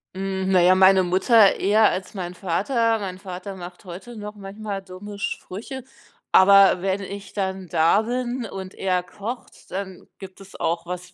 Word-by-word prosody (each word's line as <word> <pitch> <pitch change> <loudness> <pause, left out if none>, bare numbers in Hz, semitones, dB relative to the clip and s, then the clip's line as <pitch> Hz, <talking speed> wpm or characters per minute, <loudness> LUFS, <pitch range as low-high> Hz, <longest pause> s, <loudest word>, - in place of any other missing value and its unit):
Hm. 190 0 -2
Na 185 - +5
ja, 180 +1 +6
meine 190 0 +5
Mutter 195 +4 +4
eher 210 +2 +4
als 190 +3 -5
mein 180 -2 -5
Vater. 225 +6 0
Mein 185 -2 -6
Vater 190 0 -7
macht 180 +1 -10
heute 190 +7 -9
noch 210 0 -7
manchmal 200 0 -6
dumme 195 +2 -10
Sprüche, 235 +7 -5 0.5
aber 195 -1 +6
wenn 195 +1 -1
ich 200 0 -8
dann 190 -2 -3
da 165 +5 +3
bin 245 +1 -3
und 190 -2 -7
er 185 -2 -1
kocht, 215 +7 -8
dann 190 -1 -6
gibt 190 0 -11
es 195 0 -14
auch 170 +1 -1
was 180 0 -7
195 Hz, 165 wpm, -23 LUFS, 185-205 Hz, 0.5 s, ja